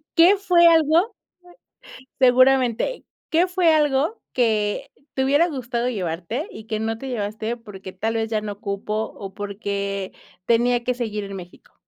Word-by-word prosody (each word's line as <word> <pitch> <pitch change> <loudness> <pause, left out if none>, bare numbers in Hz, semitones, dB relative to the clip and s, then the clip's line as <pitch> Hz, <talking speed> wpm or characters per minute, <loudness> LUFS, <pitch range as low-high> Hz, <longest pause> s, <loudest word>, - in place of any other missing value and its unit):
¿Qué 350 +4 +7
fue 350 -3 +5
algo? 330 +6 +4 1.1
Seguramente. 255 - +3 0.3
¿Qué 340 +3 +3
fue 360 -3 +3
algo 300 - +1
que 215 -4 0 0.2
te 265 - +1
hubiera 290 +6 +3
gustado 245 -4 -2
llevarte 190 - -3
y 220 - -10
que 215 -1 -2
no 225 0 -2
te 270 - -7
llevaste 220 0 -3
porque 195 -5 -10
tal 225 +4 -2
vez 225 0 -1
ya 215 -1 0
no 205 -1 -7
cupo 200 +1 -4 0.2
o 195 -1 -8
porque 200 -1 -4 0.3
tenía 240 +1 +2
que 250 - 0
seguir 215 -4 -3
en 195 0 -7
México? 180 -1 -12
235 Hz, 150 wpm, -22 LUFS, 205-285 Hz, 1.1 s, Qué